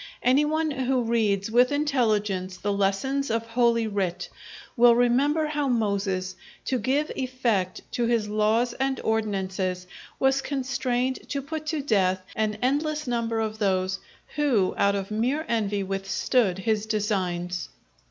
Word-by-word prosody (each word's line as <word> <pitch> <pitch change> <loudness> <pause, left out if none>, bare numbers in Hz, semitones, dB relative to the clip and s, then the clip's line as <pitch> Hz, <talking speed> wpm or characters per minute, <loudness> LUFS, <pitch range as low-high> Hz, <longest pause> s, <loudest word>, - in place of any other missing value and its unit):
Any 265 +4 +4
one 315 +1 0
who 260 -2 0
reads 220 -3 +1
with 245 +3 +4
intelligence 215 -10 0
the 200 +3 -1
lessons 200 +8 0
of 230 0 -1
Holy 230 0 +2
Writ, 195 -5 -2 0.5
will 235 -1 +6
remember 270 +6 +3
how 300 -2 -1
Moses, 200 -5 -1 0.3
to 255 - 0
give 270 +7 0
effect 240 -8 -1
to 240 -1 0
his 230 -3 +1
laws 215 +3 +1
and 265 -1 -1
ordinances, 190 -4 -1 0.3
was 270 0 +2
constrained 260 -2 -2
to 280 - -1
put 310 +1 -5
to 305 -2 -1
death 190 -7 +1
an 215 -1 0
endless 300 +3 0
number 230 -2 -1
of 220 -1 -3
those 190 -2 0 0.4
who 250 -11 +2
out 200 0 +2
of 195 +1 -4
mere 255 +9 0
envy 205 -3 0
withstood 195 +2 0
his 215 +2 -1
designs. 180 -5 -2
230 Hz, 140 wpm, -26 LUFS, 200-260 Hz, 0.5 s, will